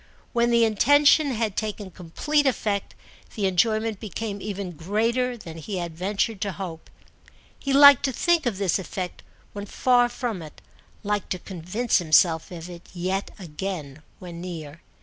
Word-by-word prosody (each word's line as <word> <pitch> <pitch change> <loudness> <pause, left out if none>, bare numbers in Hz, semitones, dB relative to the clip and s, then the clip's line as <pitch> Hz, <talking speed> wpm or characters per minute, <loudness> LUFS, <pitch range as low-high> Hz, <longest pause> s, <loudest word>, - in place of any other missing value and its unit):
When 235 -1 +2
the 235 -1 +4
intention 285 +7 +4
had 225 -5 -1
taken 210 -3 -4
complete 280 - 0
effect 210 -6 -1 0.4
the 205 - -1
enjoyment 215 +3 +1
became 210 0 -5
even 200 -2 -4
greater 230 +9 -1
than 165 -6 -9
he 190 +5 -5
had 170 -2 -4
ventured 195 +4 -1
to 200 -2 -2
hope. 175 -4 -7 0.7
He 275 - -3
liked 280 -1 +8
to 270 - +1
think 335 +2 +1
of 215 -5 -1
this 195 -2 +1
effect 180 0 -5 0.3
when 205 0 -6
far 245 +1 +3
from 235 -6 -4
it, 155 -2 -11 0.4
liked 205 -1 -2
to - - -5
convince 190 +7 -1
himself 160 0 +3
of 170 -1 -8
it 175 -1 -11
yet 185 +3 -2
again 160 -5 -6 0.2
when 170 -2 -9
near. 165 -3 -7
200 Hz, 155 wpm, -25 LUFS, 175-235 Hz, 0.7 s, liked